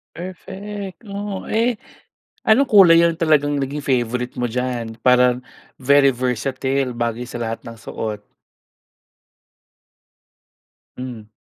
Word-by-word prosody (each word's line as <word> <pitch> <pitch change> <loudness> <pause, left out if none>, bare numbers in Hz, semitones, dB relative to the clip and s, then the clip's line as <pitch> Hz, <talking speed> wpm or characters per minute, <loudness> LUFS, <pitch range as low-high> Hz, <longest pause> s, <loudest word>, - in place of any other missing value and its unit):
Perfect, 195 +4 -8
oh. 200 -1 -5
Eh, 230 +1 +1 0.7
anong 255 +6 +4
kulay 190 -8 +7
yung 170 -1 +3
talagang 150 -3 +2
naging 140 +1 -2
favorite 125 -3 -1
mo 120 -2 -2
diyan? 120 -2 -3
Parang 125 0 +4 0.4
very 140 +1 +5
versatile 130 +2 -1
bagay 120 0 -2
sa 120 0 -7
lahat 115 -1 -4
ng 115 -1 -10
suot. 105 +1 -5 2.8
Hmm. 120 -4 -7
130 Hz, 105 wpm, -20 LUFS, 120-175 Hz, 2.8 s, kulay